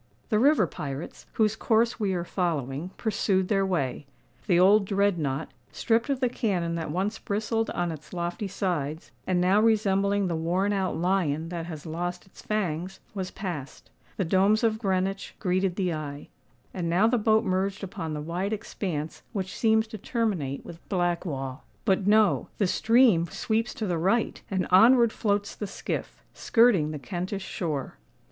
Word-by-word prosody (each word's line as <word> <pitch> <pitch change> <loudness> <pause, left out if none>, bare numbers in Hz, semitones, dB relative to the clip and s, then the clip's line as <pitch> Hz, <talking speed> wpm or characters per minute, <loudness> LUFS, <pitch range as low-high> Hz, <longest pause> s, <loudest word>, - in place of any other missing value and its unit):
The 215 -3 +3
river 275 -4 +5
pirates, 145 -1 -7
whose 220 -1 +2
course 230 +1 +2
we 195 -3 0
are 175 - -1
following, 160 -4 -2
pursued 195 -4 0
their 195 -2 +2
way: 145 -5 -2 0.4
the 175 -4 +4
old 200 +3 +6
Dreadnought, 175 -8 0 0.2
stripped 230 +3 +1
of 275 -1 0
the 255 - +3
cannon 190 -9 -1
that 165 -2 -3
once 195 +7 -1
bristled 220 +2 -1
on 175 -1 -1
its 155 -2 -10
lofty 175 +3 -3
sides, 170 -6 -3 0.2
and 185 -1 +2
now 185 +4 +4
resembling 200 -2 +2
the 175 -2 -1
worn 180 +5 0
out 190 -4 -1
lion 165 -3 0
that 170 -1 -4
has 155 -3 -7
lost 175 +2 -4
its 190 - -16
fangs, 185 -3 -2
was 190 -3 -3
passed;—the 180 +1 -6
domes 195 +6 +3
of 220 -1 +2
Greenwich 195 -1 -1
greeted 185 -1 0
the 185 -3 0
eye;—and 155 +3 -7
now 180 +6 +3
the 235 +1 +3
boat 220 +1 +3
merged 190 +1 -1
upon 165 -5 -4
the 150 - -4
wide 180 +7 -2
expanse 180 -7 -4
which 190 -3 -3
seems 220 -1 +3
to 220 -1 -9
terminate 190 - -2
with 170 0 -10
Blackwall. 170 -8 -2 0.2
But, 195 -2 +2
no! 210 -2 +4
the 205 - +2
stream 220 -3 +4
sweeps 225 +7 -1
to 220 - -3
the 175 -4 -1
right; 210 +7 +1
and 190 -2 0
onward 235 +4 +6
floats 205 -1 0
the 210 - -5
skiff—skirting 210 -3 +1
the 155 - -4
Kentish 185 +5 -4
shore. 150 -7 -4
190 Hz, 160 wpm, -27 LUFS, 170-215 Hz, 0.4 s, old